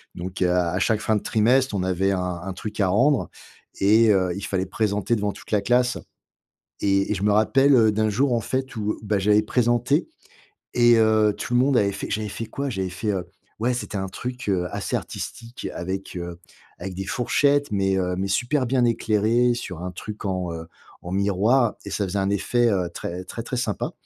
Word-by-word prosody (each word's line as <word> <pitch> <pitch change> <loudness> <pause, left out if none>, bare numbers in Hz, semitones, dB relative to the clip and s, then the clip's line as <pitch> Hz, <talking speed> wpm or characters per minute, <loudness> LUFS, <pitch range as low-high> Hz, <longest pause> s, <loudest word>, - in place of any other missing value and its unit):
Donc 90 +2 -6
à 90 -1 +2
à 90 - -1
chaque 105 +2 +2
fin 110 - +1
de 105 - 0
trimestre 125 +2 +2
on 95 - 0
avait 95 +1 +1
un 90 -1 -1 0.2
un 95 0 -4
truc 105 +3 -7
à 100 - +3
rendre 125 +8 +2 0.5
et 110 +3 +5
heu, 95 -3 +2
il 100 - -5
fallait 95 -2 -1
présenter 105 +3 0
devant 105 -1 -1
toute - - -14
la 105 -2 +2
classe 125 0 +2 0.8
et 100 +1 +2
et - - +1
je 95 - -4
me 105 - +3
rappelle, 135 +6 +4
heu, 110 -3 +5
d'un 110 +1 +1
jour, 130 +5 +1
en 115 - +2
fait, 130 +3 -3
où 105 -1 -2
bah, 105 -1 0
j'avais 105 +2 +3
présenté 120 - +1 0.7
et 120 -1 +6
heu, 110 -1 +4
tout 120 - -4
le 120 - +5
monde 135 +1 +3
avait 100 -3 +2
fait 100 - -6
j'avais 105 0 -2
fait 115 +2 -5
quoi? 140 +4 -4
J'avais 95 -4 -3
fait, 100 +4 -3
heu, 90 -2 -2 0.4
ouais, 120 +2 +1
c'était 120 -4 -4
un 95 0 -3
truc, 125 +4 -6
heu, 90 -2 +1
assez - - -2
artistique 115 +1 -6
avec, 95 +2 -5
heu, 85 -1 -6 0.4
avec 95 +1 -6
des 95 +1 -5
fourchettes. 140 +5 +1
Mais, 95 -1 +1
heu, 90 -1 -1
mais 95 +1 -2
super 125 +7 +1
bien 125 0 +2
éclairé, 115 +1 +2
sur 90 -8 -6
un 90 - -3
truc 105 +4 -8
en, 90 -3 -2
heu, 80 0 -7 0.4
en 90 - -7
miroir 105 +5 +2
et 100 - -7
ça 100 - -1
faisait 95 +1 -2
un 95 - +1
effet, 120 +4 +2
heu, 90 -3 0
très 90 +2 -5
très, 115 +5 -6
très 125 - -4
sympa 115 -4 -2
105 Hz, 210 wpm, -24 LUFS, 95-120 Hz, 0.8 s, et